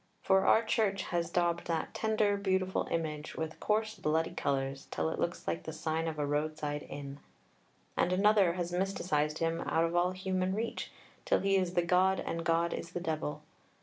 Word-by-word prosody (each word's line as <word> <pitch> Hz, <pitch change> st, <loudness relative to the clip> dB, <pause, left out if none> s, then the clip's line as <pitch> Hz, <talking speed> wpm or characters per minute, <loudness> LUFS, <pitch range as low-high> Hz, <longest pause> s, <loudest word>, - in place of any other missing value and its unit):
For 190 Hz, 0 st, +4 dB
our 225 Hz, -, +6 dB
Church 215 Hz, -3 st, +1 dB
has 170 Hz, -2 st, -1 dB
daubed 170 Hz, -1 st, 0 dB
that 165 Hz, -2 st, -2 dB
tender, 215 Hz, -2 st, +2 dB
beautiful 190 Hz, -2 st, 0 dB
image 155 Hz, -2 st, -3 dB
with 160 Hz, 0 st, -4 dB
coarse 215 Hz, +1 st, +1 dB
bloody 160 Hz, -1 st, 0 dB
colours 135 Hz, 0 st, -2 dB
till 80 Hz, -1 st, -1 dB
it -, -, -4 dB
looks -, -, -2 dB
like 85 Hz, 0 st, -1 dB
the -, -, -6 dB
sign 160 Hz, +1 st, -2 dB
of 160 Hz, -1 st, -3 dB
a 150 Hz, -, 0 dB
road 150 Hz, +2 st, -1 dB
side 150 Hz, -1 st, -3 dB
inn. 140 Hz, 0 st, -7 dB, 0.8 s
And 180 Hz, -, +2 dB
another 195 Hz, -1 st, +4 dB
has 175 Hz, -1 st, -3 dB
mysticized 175 Hz, -5 st, 0 dB
him 165 Hz, 0 st, 0 dB
out 165 Hz, -, +1 dB
of 165 Hz, +1 st, -2 dB
all 175 Hz, +1 st, +3 dB
human 185 Hz, 0 st, -1 dB
reach 230 Hz, +2 st, -3 dB, 0.3 s
till -, -, +2 dB
he 195 Hz, 0 st, +2 dB
is 185 Hz, -2 st, +1 dB
the 175 Hz, -, +3 dB
God 185 Hz, +2 st, +3 dB
and 165 Hz, 0 st, -3 dB
God 165 Hz, +1 st, +2 dB
is 170 Hz, -, -6 dB
the -, -, -2 dB
Devil. 155 Hz, -3 st, -3 dB
170 Hz, 190 wpm, -32 LUFS, 155-190 Hz, 0.8 s, our